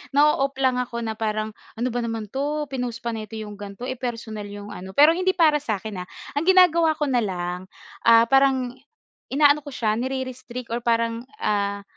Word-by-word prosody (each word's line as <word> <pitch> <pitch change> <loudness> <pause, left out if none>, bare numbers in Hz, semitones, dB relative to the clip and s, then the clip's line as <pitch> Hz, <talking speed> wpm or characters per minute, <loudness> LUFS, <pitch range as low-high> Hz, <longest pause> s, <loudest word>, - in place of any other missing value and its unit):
nao-off 285 -2 +3
lang 260 -2 +1
ako 235 -1 -3
na 220 0 -4
parang, 215 0 -1 0.2
"Ano 240 +2 -1
ba 245 - -1
naman 225 -3 -4
'to, 295 +3 -1
pinost 245 -3 -4
pa 235 - -1
nito 220 -1 -6
'yong 210 -2 -7
ganito, 200 +3 -8
eh, 255 -1 -4
personal 225 -4 -5
'yong 205 0 -8
ano." 190 -1 -9
Pero 295 +3 +8
hindi 370 +2 +1
para 310 -4 +4
sa'kin, 215 -6 -4
ah, 180 - -6 0.3
ang 330 - -4
ginagawa 340 -4 +5
ko 300 - -2
na 245 - +3
lang, 180 -4 -2 0.5
ah, 230 0 +8
parang 265 0 +3 0.6
inaano 290 +1 +4
ko 290 0 -10
siya 215 -1 0
nirerestrict 255 -2 -5
or 235 - 0
parang, 230 0 0 0.2
ah, 200 -1 0
235 Hz, 185 wpm, -24 LUFS, 215-270 Hz, 0.6 s, Pero